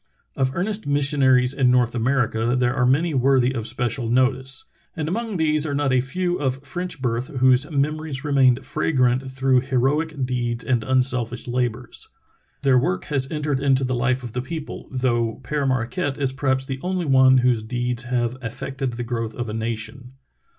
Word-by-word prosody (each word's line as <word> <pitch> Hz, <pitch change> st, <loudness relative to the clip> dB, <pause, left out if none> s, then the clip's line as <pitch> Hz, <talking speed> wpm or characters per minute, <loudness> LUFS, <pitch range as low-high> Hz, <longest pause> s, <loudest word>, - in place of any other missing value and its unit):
Of 130 Hz, -1 st, 0 dB
earnest 205 Hz, +3 st, -1 dB
mis 145 Hz, 0 st, +2 dB
sionaries 130 Hz, -2 st, +3 dB
in 130 Hz, -2 st, +3 dB
North 125 Hz, -1 st, +3 dB
America 120 Hz, -1 st, +1 dB
there 125 Hz, 0 st, +2 dB
are 125 Hz, -2 st, +2 dB
many 155 Hz, +6 st, +2 dB
worthy 130 Hz, -1 st, +3 dB
of 115 Hz, -3 st, -3 dB
special 120 Hz, 0 st, -2 dB
notice, 130 Hz, +2 st, +1 dB, 0.3 s
and 155 Hz, -2 st, -2 dB
among 220 Hz, +3 st, -2 dB
these 155 Hz, -2 st, +2 dB
are 145 Hz, -2 st, -2 dB
not 140 Hz, -2 st, +1 dB
a 130 Hz, -, +4 dB
few 175 Hz, +7 st, -2 dB
of 135 Hz, 0 st, -2 dB
French 175 Hz, -4 st, -4 dB
birth 120 Hz, +1 st, -1 dB
whose 130 Hz, +2 st, +4 dB
memories 150 Hz, -1 st, -2 dB
remain 135 Hz, -4 st, +4 dB
fragrant 130 Hz, -2 st, 0 dB
through 130 Hz, -1 st, +2 dB
heroic 135 Hz, +3 st, 0 dB
deeds 120 Hz, -1 st, -2 dB
and 120 Hz, -3 st, 0 dB
unselfish 125 Hz, -2 st, 0 dB
labors. 120 Hz, -1 st, -3 dB, 0.5 s
Their 135 Hz, -2 st, +5 dB
work 95 Hz, -7 st, -1 dB
has 135 Hz, -1 st, +1 dB
entered 150 Hz, -3 st, -1 dB
into 135 Hz, -1 st, +2 dB
the 130 Hz, 0 st, -1 dB
life 130 Hz, +1 st, 0 dB
of 120 Hz, -3 st, -7 dB
the 125 Hz, -, -2 dB
people, 155 Hz, +3 st, -7 dB
though 120 Hz, -3 st, 0 dB
Pere 145 Hz, +2 st, -1 dB
Marquette 135 Hz, +4 st, -1 dB
is 135 Hz, -2 st, 0 dB
perhaps 130 Hz, -1 st, 0 dB
the 135 Hz, -1 st, -5 dB
only 180 Hz, -1 st, -2 dB
one 130 Hz, -2 st, +5 dB
whose 120 Hz, -3 st, +3 dB
deeds 120 Hz, +2 st, -3 dB
have 125 Hz, 0 st, -1 dB
affected 130 Hz, +2 st, -4 dB
the 120 Hz, +1 st, -4 dB
growth 115 Hz, -2 st, -3 dB
of 120 Hz, -2 st, -4 dB
a -, -, -4 dB
nation. 115 Hz, +3 st, -5 dB
130 Hz, 180 wpm, -22 LUFS, 125-140 Hz, 0.5 s, Their